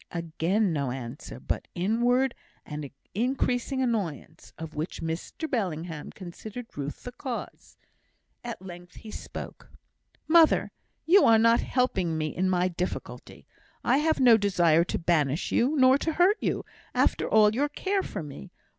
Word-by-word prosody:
Again 170 +4 0
no 140 -4 -1
answer, 125 +1 -7
but - - -3
inward 240 +7 +2 0.3
and 150 -2 -6 0.2
increasing 250 +3 0
annoyance, 180 - -3
of 160 -1 -7
which 155 +3 -4
Mr 165 - -4
Bellingham 170 - -3
considered 215 +6 -9
Ruth 145 0 -5
the 245 - -6
cause. 250 -1 -7 0.7
At 235 -5 -6
length 175 -1 -11
he 220 - -10
spoke. - - -8 0.6
"Mother, 325 -1 +5 0.3
you 380 +4 +6
are 225 -1 +6
not 230 +1 +5
helping 190 -11 0
me 155 -1 -3
in 185 +1 +1
my 180 0 +2
difficulty. 180 0 -6 0.4
I 250 +3 +3
have 315 +1 +1
no 245 -4 +7
desire 175 -6 +3
to - - -2
banish 160 -3 0
you, 265 +6 +2
nor 260 +1 +6
to 320 - -1
hurt 365 +7 +4
you, - - -1 0.3
after - - +1
all 215 -1 +5
your 285 +5 0
care 390 +6 -1
for 170 - -5
me. 140 - -9
200 Hz, 145 wpm, -27 LUFS, 165-250 Hz, 0.7 s, no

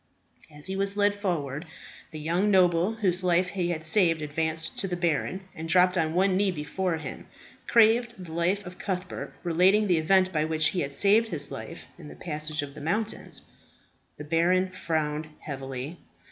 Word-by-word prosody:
As 150 0 -13
he 190 - -4
was 195 +1 -1
led 205 0 +3
forward, 165 -7 -3 0.4
the 155 - -8
young 170 +7 0
noble 180 0 +3
whose 185 -5 +1
life 180 0 +2
he 180 -3 -2
had 160 -2 -3
saved 165 -2 +3
advanced 160 +2 0
to 195 - +1
the 180 - -2
baron, 175 +2 -1
and 160 +1 -7
dropping 180 0 +4
on 160 0 -2
one 190 +1 +3
knee 200 +1 +2
before 175 +2 -2
him, 160 - -8 0.4
craved 235 +1 +4
the 180 -3 -9
life 175 +5 0
of 180 +1 -10
Cuthbert, 185 -2 -4
relating 185 +5 +3
the 180 -5 +2
event 185 +3 +3
by 155 -1 +1
which 155 -1 +2
he 185 - -2
had 140 -3 -3
saved 210 +7 +4
his 165 -9 -1
life - - -8
in - - -10
the 75 - -10
passage 150 - -3
of 140 -1 -8
the 150 - -10
mountains. 210 +8 -3 0.7
The - - -7
baron 175 +4 +2
frowned 155 -4 -2
heavily. 135 +2 -6
175 Hz, 180 wpm, -27 LUFS, 155-190 Hz, 0.7 s, dropping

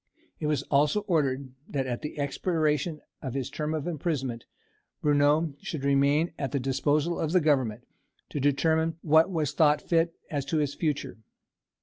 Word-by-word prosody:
It 150 - -2
was 150 -3 0
also 145 +9 +2
ordered 140 -8 0 0.2
that 135 -2 -1
at 120 -2 -3
the 150 - -6
expiration 150 +1 0 0.2
of 130 -3 -5
his 135 -1 -3
term 155 +2 -2
of 150 - -3
imprisonment 145 -8 -2 0.5
Bruneau 145 +1 +3
should 170 -8 -5
remain 140 +4 +2
at 135 - -2
the 140 - 0
disposal 145 +5 0
of 160 +1 -1
the 185 - +6
Government, 135 -9 +1 0.4
to 145 - -3
determine 160 +3 +2
what 160 +3 +5
was 155 -6 -1
thought 150 -1 +4
fit 165 +1 +1 0.2
as 145 -2 -1
to 160 +3 -1
his 145 -2 0
future. 145 - -2
150 Hz, 160 wpm, -28 LUFS, 140-160 Hz, 0.5 s, the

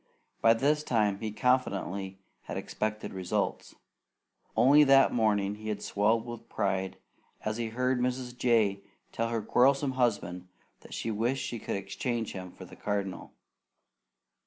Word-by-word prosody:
By 115 0 +6
this 145 +5 +2
time 105 -7 +1
he 110 0 -3
confidently 100 -6 0 0.3
had - - -5
expected 110 -1 -3
results. 95 -2 -2 0.8
Only 145 +4 +7
that 135 -1 +6
morning 105 -4 +2
he 110 +1 -7
had 105 - -3
swelled 110 +3 +1
with 120 -1 -8
pride 95 -2 -1 0.5
as 110 +1 -1
he 120 -1 -2
heard 125 +3 0
Mrs. 125 0 -2
Jay 110 -5 +2 0.3
tell 115 0 -1
her 115 -2 -2
quarrelsome 135 +5 +3
husband 100 -8 -1 0.3
that - - -10
she 115 - -2
wished 120 +5 0
she 120 - -4
could - - -3
exchange 110 +4 -3
him 90 -2 -7
for - - -11
the - - -13
Cardinal. 100 -2 -3
110 Hz, 145 wpm, -29 LUFS, 100-125 Hz, 0.8 s, Only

